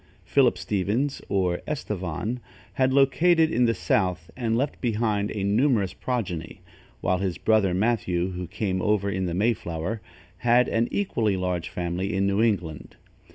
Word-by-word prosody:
Philip - - +3
Stevens, 105 +9 -1
or 90 -3 0
Estevan, 105 - -3 0.3
had 130 0 +2
located 160 +5 +4
in 125 +1 +3
the 115 -1 +2
south 90 -5 0
and 115 -2 0
left 140 +4 -2
behind 105 -3 0
a 105 -2 -3
numerous 105 -2 +2
progeny, 95 -10 -4 0.4
while 90 0 +1
his 95 -3 -2
brother 105 -5 +2
Mathew, 95 -4 0
who 90 -1 -5
came 95 0 -2
over 105 -2 +1
in 95 -2 -1
the 85 - -2
Mayflower, 100 -1 -1 0.4
had 120 +3 +4
left - - -4
an 115 +1 +2
equally 110 - 0
large 90 -2 -2
family 90 +3 -2
in 95 0 +1
New 100 +2 +2
England. 90 -9 -1
105 Hz, 155 wpm, -25 LUFS, 90-120 Hz, 0.4 s, located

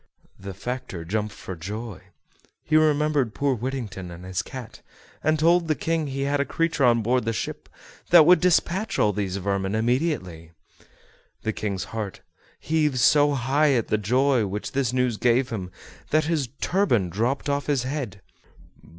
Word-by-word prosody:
The 95 0 -8
factor 120 -5 -5
jumped 105 +4 -2
for 95 - -7
joy; 105 +4 -6 0.6
he 155 - 0
remembered 150 -5 +2
poor 140 -1 +1
Whittington 120 -7 -5
and 85 +1 -10
his 95 -1 -2
cat, 125 -4 -9 0.4
and 155 0 +2
told 170 +2 +3
the 155 - +1
King 165 -1 -1
he 135 0 -4
had 140 +1 0
a - - +3
creature 165 0 -1
on 120 -2 +3
board 125 +3 +1
the 115 +1 -1
ship 110 - -5 0.4
that 170 -3 +8
would 180 +2 +6
despatch 180 +3 +1
all 105 - +3
these 100 -2 -2
vermin 100 +1 -1
immediately. 110 - -1 0.9
The 110 - -1
King's 100 -3 -3
heart 110 -4 -5 0.4
heaved 150 -4 0
so 145 +3 +4
high 140 +3 +2
at 115 -4 0
the 110 - +1
joy 125 +2 +2
which 100 +2 -4
this 135 -3 0
news 125 -3 0
gave 125 +2 +2
him 95 -5 -4 0.4
that 155 +1 +3
his 155 -6 -1
turban 125 - +1
dropped 120 - -1
off 140 0 -1
his 140 -4 +1
head. 130 -8 -4
125 Hz, 165 wpm, -24 LUFS, 105-150 Hz, 0.9 s, that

